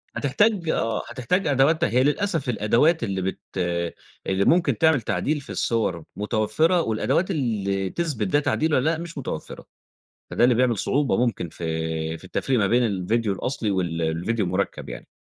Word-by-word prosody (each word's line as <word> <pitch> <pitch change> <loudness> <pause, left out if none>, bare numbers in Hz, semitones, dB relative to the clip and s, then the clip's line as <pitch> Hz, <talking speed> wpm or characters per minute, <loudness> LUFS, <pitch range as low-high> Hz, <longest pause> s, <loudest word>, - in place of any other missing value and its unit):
هتحتاج 180 - +1
آه، 115 -6 0
هتحتاج 160 - -1
أدواتها 145 +5 +3
هي 125 +2 +3
للأسف 155 -2 0
الأدوات 120 +8 +2
اللي 95 -3 -2
بت 95 +1 -3 0.9
اللي 95 +1 +1
ممكن 175 +1 +3
تعمل 160 -6 +3
تعديل 150 +6 -1
في - - -12
الصوَر 100 -8 -1
متوفرة، 110 - +1
والأدوات 160 - 0
اللي 100 - -1
تثبت 145 - -2
ده 145 - +3
تعديل 155 +1 0
والّا 140 +4 +3
لا، 165 - 0
مش 165 -2 -7
متوفرة. 120 - -6 0.6
فده - - +1
اللي 120 -1 +5
بيعمل 120 -3 +2
صعوبة 140 +6 +1
ممكن 100 -8 -3
في 80 0 -3
في 80 - -17
التفريق 125 +6 -1
ما 100 - +2
بين 120 +3 +3
الفيديو 105 +2 0
الأصلي 115 -2 -2
وال 85 -3 -1
الفيديو 90 +7 -1
المُركَّب 95 -6 -2
يعني. - - -8
115 Hz, 160 wpm, -24 LUFS, 95-150 Hz, 0.9 s, اللي